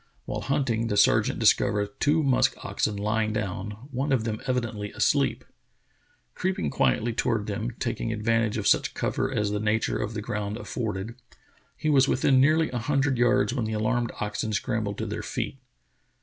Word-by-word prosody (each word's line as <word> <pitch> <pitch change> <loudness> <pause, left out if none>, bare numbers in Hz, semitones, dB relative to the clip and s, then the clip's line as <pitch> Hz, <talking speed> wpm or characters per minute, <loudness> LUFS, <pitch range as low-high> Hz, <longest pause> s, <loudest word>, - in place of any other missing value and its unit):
While - - -4
hunting, 130 -5 0
the 105 - -1
sergeant 105 - +4
discovered 105 -1 +3
two 155 +2 +3
musk 135 -2 +3
oxen 105 - -1
lying 110 +1 0
down, 105 +3 -4
one 135 +3 -1
of 130 -4 +2
them 110 -1 -3
evidently 115 -5 -2
asleep. - - +1 0.9
Creeping 185 - -1
quietly 110 - +1
toward 110 -2 0
them, 110 +3 -3
taking 115 -2 -2
advan 115 +1 +1
tage 110 0 -3
of 105 - -3
such - - +2
cover 130 0 -1
as 105 -5 0
the 105 - -1
nature 110 +1 0
of 110 - -3
the 105 - -2
ground 105 0 -3
afforded, 110 -1 -4 0.6
he 155 - 0
was 135 -2 +5
within 130 0 +3
nearly 155 +1 +3
a 125 - -2
hundred 135 +1 +1
yards 120 0 +3
when 125 -4 -1
the 110 - -3
alarmed 115 +2 0
oxen 105 +1 -2
scrambled 105 0 -1
to - - -3
their - - -4
feet. - - -4
110 Hz, 175 wpm, -26 LUFS, 105-130 Hz, 0.9 s, was